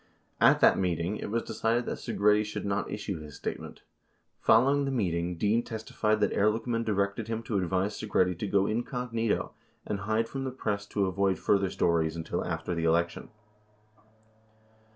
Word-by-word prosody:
At - - +5
that - - +6
meeting 90 +2 -1
it - - -5
was 115 +2 -1
decided 120 +2 0
that - - -4
Segretti 105 +1 +2
should 105 - -5
not 100 0 -1
issue 100 -4 -4
his 75 -2 -10
statement. - - -6 0.6
64 - - -42
Following 135 +5 +5
the - - -1
meeting 90 -8 -1
Dean 105 +5 +2
testified 110 -1 -1
that 105 - +2
Ehrlichman 115 +3 +1
directed 100 0 -1
him 115 0 -3
to 110 -3 -1
advise 95 +3 -1
Segretti 95 -4 +2
to 105 - -2
go 100 0 +2
incognito 115 0 -1 0.3
and 105 - -3
hide 110 +3 0
from 135 +2 -5
the 135 - -2
press 105 -5 -3
to 100 -1 0
avoid 95 0 +1
further 100 -2 +2
stories 80 -3 +1
until 85 +1 -3
after 80 0 -3
the 85 -1 -2
election. 85 +1 0
105 Hz, 170 wpm, -29 LUFS, 90-115 Hz, 0.6 s, that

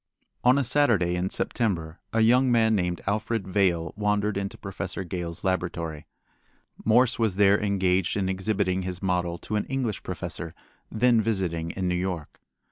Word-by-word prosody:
On 125 +2 +5
a 140 - +2
Saturday 115 -10 +3
in 90 +1 -1
September 85 -11 -1
a 115 - +2
young 125 +3 +4
man 110 -2 +4
named 90 -4 0
Alfred 110 0 -1
Vail 90 -4 +1
wandered 105 0 0
into 100 0 -3
Professor 95 -1 -5
Gale's 85 -2 -5
laboratory. 85 -5 -2 0.8
Morse 120 +3 +3
was 110 -5 +1
there 100 +1 +4
engaged 95 -2 +1
in 95 -2 0
exhibiting 95 0 0
his 90 0 -5
model 90 -2 0
to 105 +4 -3
an 105 - -1
English 130 -6 -2
professor 85 -1 -5 0.4
then 115 0 +3
visiting 90 -7 -1
in 95 +1 -3
New 90 - +1
York. 90 -3 -4
95 Hz, 155 wpm, -26 LUFS, 90-110 Hz, 0.8 s, On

